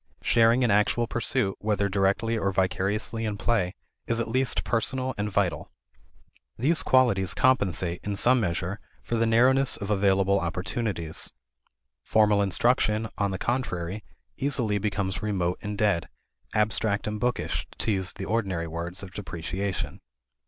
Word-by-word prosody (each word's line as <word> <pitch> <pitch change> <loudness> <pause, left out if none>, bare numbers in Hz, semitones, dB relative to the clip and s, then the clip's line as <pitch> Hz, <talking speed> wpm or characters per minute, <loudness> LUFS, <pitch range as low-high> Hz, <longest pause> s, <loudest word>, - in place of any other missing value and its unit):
Sharing 115 +2 +4
in 120 - +3
actual 105 +3 +2
pursuit, 115 -3 -1
whether 105 -1 0
directly 100 +4 +1
or 100 -3 0
vicariously 95 +4 -1
in 105 -2 -2
play, 100 -6 0 0.3
is 115 0 0
at 115 - -1
least 130 +3 +1
personal 130 +3 -1
and 105 +1 -2
vital. 95 -7 -1 0.9
These 155 +8 +3
qualities 100 -8 +3
compensate, 95 -9 +2
in 100 0 -2
some 125 +5 +3
measure, 90 0 -2 0.2
for - - -5
the 115 0 +2
narrowness 125 +2 +4
of 100 0 -4
available 100 -1 +3
opportunities. 90 -1 -2 0.7
Formal 105 - +3
instruction, 110 +2 +1
on 100 -1 +1
the 95 - -3
contrary, 105 -5 -2 0.3
easily 125 -7 0
becomes 100 -2 -2
remote 95 -4 -1
and 105 0 -5
dead 100 -6 +1 0.5
abstract 105 -1 +1
and 105 0 -3
bookish, 125 +2 -1
to - - 0
use 95 -3 -1
the 95 - -6
ordinary 95 -7 -1
words 85 +3 -4
of 95 -1 -9
depreciation. 95 0 -4
105 Hz, 140 wpm, -26 LUFS, 95-115 Hz, 0.9 s, Sharing